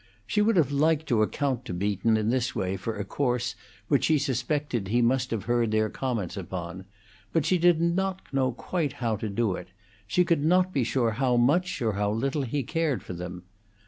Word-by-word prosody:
She 210 - +1
would 225 +2 +3
have 150 -6 +3
liked 155 +2 +2
to 115 -3 +3
account 130 +3 0
to 90 - -4
Beaton 100 +4 +1
in 110 +1 0
this 125 -1 0
way 95 0 -1
for 105 +3 -4
a 105 - -3
course 125 0 -1 0.3
which 140 - +2
she 155 - +4
suspected 135 -4 -1
he 120 +5 +2
must 125 +1 +2
have 115 -4 -2
heard 120 -1 +1
their 110 0 +1
comments 115 -9 -3
upon, 90 -1 -6 0.5
but 165 -3 +1
she 180 +2 +2
did 175 -1 +4
not 185 +3 0 0.3
quite 160 -7 -2
know - - -18
how 115 -3 0
to 110 - -4
do 100 0 0
it; 90 -1 -6 0.4
she 180 - +2
could 170 -4 +2
not 180 +3 +3
be 135 - +2
sure 115 0 +1
how 125 +2 +1
much 150 +6 +2
or 110 -2 +1
how 100 +1 0
little 135 +7 -1
he 135 +2 -2
cared 160 0 -1
for - - -7
them. 90 +1 -7
125 Hz, 210 wpm, -27 LUFS, 110-150 Hz, 0.5 s, she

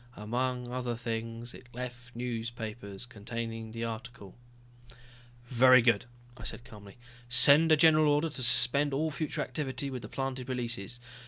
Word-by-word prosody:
Among 125 +3 -3
other 125 -1 -3
things, 115 0 -5
it 130 - -14
left 120 -1 -8
newspapers 115 -3 -5
containing 115 0 -6
the 115 +1 -6
article." 115 -3 -7 1.1
"Very 130 0 +6
good," 115 -3 +3 0.3
I - - -12
said 120 - -6
calmly. 105 -4 -13 0.3
"Send 145 +6 +7
a 155 - +6
general 155 -1 +5
order 150 +3 +1
to 130 - -7
suspend 135 +3 +3
all 155 +3 -1
future 155 +1 -3
activity 140 -2 -4
with 130 -2 -5
the 105 - -9
planted 130 -1 -4
releases. 120 -3 -3
120 Hz, 145 wpm, -30 LUFS, 115-130 Hz, 1.1 s, Send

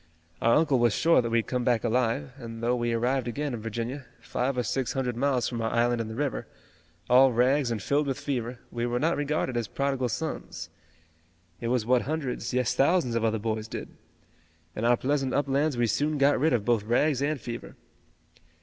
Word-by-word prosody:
Our 115 - +4
uncle 150 -5 +3
was 120 -2 +3
sure 165 -4 +4
that 115 - -3
we'd 115 -1 +1
come 125 -1 -2
back 120 -2 +2
alive, 125 +3 0
and 115 -1 -8
though 120 +1 +2
we 120 -1 -1
arrived 125 +2 0
again 140 +3 -3
in 115 - -5
Virginia, 115 +4 -4
five 125 +1 -2
or 125 - +1
six 130 0 -1
hundred 125 -3 -1
miles 130 -1 +1
from 120 -2 -3
our 115 - 0
island 120 0 +1
in 110 - -4
the 110 - -6
river, 145 +1 -2 0.6
all 130 +2 +6
rags 125 +3 +2
and 115 -2 -2
filled 145 +5 +1
with 135 0 -2
fever, 125 -4 -3
we 120 0 -2
were 120 0 -1
not 165 +4 +2
regarded 145 -3 -1
as 120 -2 -1
prodigal 135 +1 -1
sons. 160 +7 -5 0.9
It 115 - -3
was 120 -2 +1
what 125 +1 +3
hundreds, 145 -4 -3
yes, 125 -1 +1
thousands 140 -4 +2
of 115 -1 0
other 110 0 +1
boys 110 0 -3
did. - - -6 0.9
In 110 - -2
our 120 0 +4
pleasant 135 0 0
uplands 140 0 +1
we 120 - +3
soon 145 +7 0
got 140 0 +3
rid 155 +4 +3
of 110 -4 0
both 120 -3 +2
rags 130 +5 +2
and 145 0 0
fever." 115 0 -7
125 Hz, 205 wpm, -27 LUFS, 115-140 Hz, 0.9 s, all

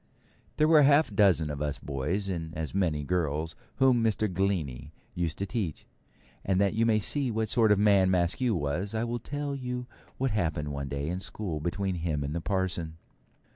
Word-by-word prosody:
There 155 - +4
were 160 -1 +7
a - - +6
half 145 -3 +4
dozen 95 -7 +3
of 75 0 -5
us 75 -2 -1
boys, 75 +9 -2
and 80 -3 -4
as 80 -1 -4
many 85 -6 0
girls, 80 -1 -1 0.2
whom 130 -3 +4
Mr. 110 -1 +1
Glennie 85 -9 -1 0.2
used 85 -2 -2
to 100 - -2
teach; 100 - -4 0.6
and 95 -1 +1
that 100 -1 +2
you 115 +1 +2
may 110 -1 +4
see 135 +5 +1
what 110 -1 -1
sort 110 -2 +4
of 105 - +5
man 100 -2 +4
Maskew 95 +6 +1
was, 85 +7 -2
I 110 - 0
will 120 0 -2
tell 145 +3 -4
you 125 -2 -4 0.3
what 135 -1 0
happened 80 -7 -1
one 70 -1 -4
day 70 +1 -3
in 90 +3 -2
school 95 -5 -3
between 95 +5 -2
him 80 -4 -2
and 70 +1 -3
the 85 - -2
parson. 90 -4 -2
95 Hz, 195 wpm, -28 LUFS, 80-110 Hz, 0.6 s, were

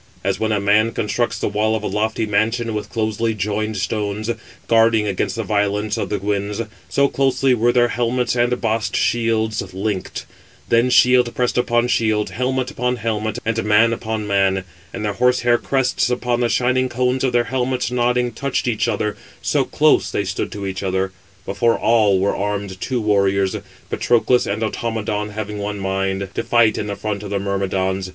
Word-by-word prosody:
As - - -1
when 110 0 0
a 105 - +1
man 105 +3 +3
constructs 110 +3 -1
the - - -1
wall 105 +2 +1
of 110 - -3
a - - -1
lofty 110 +2 -1
mansion 110 +3 0
with 105 -1 -4
closely 110 0 -1
joined 105 +1 -2
stones, 105 +2 -2 0.4
guarding 115 -1 +4
against 100 +3 -1
the 115 - -2
violence 105 +1 0
of 115 - -3
the 105 - -1
winds, 100 +1 -2 0.3
so 140 0 +3
closely 135 -1 +2
were 120 0 +3
their 120 0 +3
helmets 120 +1 0
and 120 +1 +1
bossed 110 -3 -1
shields 110 -2 +1
linked: 100 -1 -3 0.4
then 115 +2 +3
shield 125 -1 +5
pressed 125 -1 0
upon 120 -1 +2
shield, 110 -3 +1
helmet 130 +2 -1
upon 125 -3 -1
helmet, 110 -1 -2
and 115 0 0
man 110 +2 +4
upon 110 -2 -3
man; 95 -2 +1 0.3
and 105 - -5
the 105 - -1
horse 125 +3 +2
hair 120 0 +3
crests 130 -2 0
upon 125 -1 0
the 120 -1 +1
shining 130 +1 +1
cones 125 +1 0
of 130 - +2
[their 120 0 +3
helmets] 125 -1 0
nodding, 125 0 +1
touched 140 -1 -2
each 115 -3 0
other; 105 0 -1 0.3
so - - +2
close - - +3
stood - - -1
they - - -16
to 100 - -5
each 95 -1 -4
other. 95 0 -1 0.3
Before 115 +3 +1
all 110 -4 +3
were 95 +2 +1
armed 100 -2 -3
two 130 -2 -1
warriors. 100 -3 +1 0.4
Patroclus 120 +1 +2
and 105 +3 -2
Automedon, 110 -2 -2
having 105 -1 -5
one 105 0 -4
mind, 95 0 -2
to - - -1
fight 115 -2 +3
in 105 - -3
the 100 - -3
front 105 -1 -4
of 105 - -7
the 100 - -1
Myrmidons. 95 -1 -1
110 Hz, 185 wpm, -20 LUFS, 100-120 Hz, 0.4 s, shield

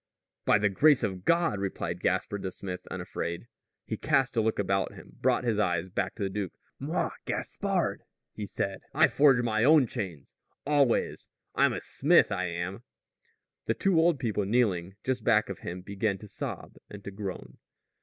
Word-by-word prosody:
"By - - +5
the 105 0 +2
grace 145 +8 +4
of 95 -2 -3
God!" 170 - +2
replied 100 -1 -3
Gaspard 100 -1 -1
the 95 - -3
smith, 90 -1 -7
unafraid. 85 +5 -4 0.4
He - - -3
cast 135 -2 +1
a 115 - +3
look 110 0 0
about 95 -1 0
him, - - -14
brought - - +2
his 115 -4 0
eyes 90 -3 0
back - - -2
to 105 - -4
the 95 - 0
duke. 100 -3 -3 0.3
"Moi, - - -1
Gaspard," - - -1 0.3
he 105 -1 -5
said, 95 0 -3
"I 155 +2 +6
forge 135 -4 +4
my 110 -1 +1
own 150 0 +6
chains 95 - -6 0.3
always! 140 -4 +1 0.2
I'm - - +3
a - - -4
smith, 160 -4 +3
I 95 -2 -1
am." 85 +4 -4 0.8
The 115 - 0
two 180 - +2
old 165 -1 +4
people 110 -5 -1
kneeling 95 -4 +1
just 130 -3 -1
back 110 -3 +3
of 100 - -5
him 90 +1 -6
began 100 +1 -1
to 105 - -11
sob - - -6
and 105 -1 -10
to 100 - -6
groan. 95 -2 -7
105 Hz, 175 wpm, -29 LUFS, 95-125 Hz, 0.8 s, I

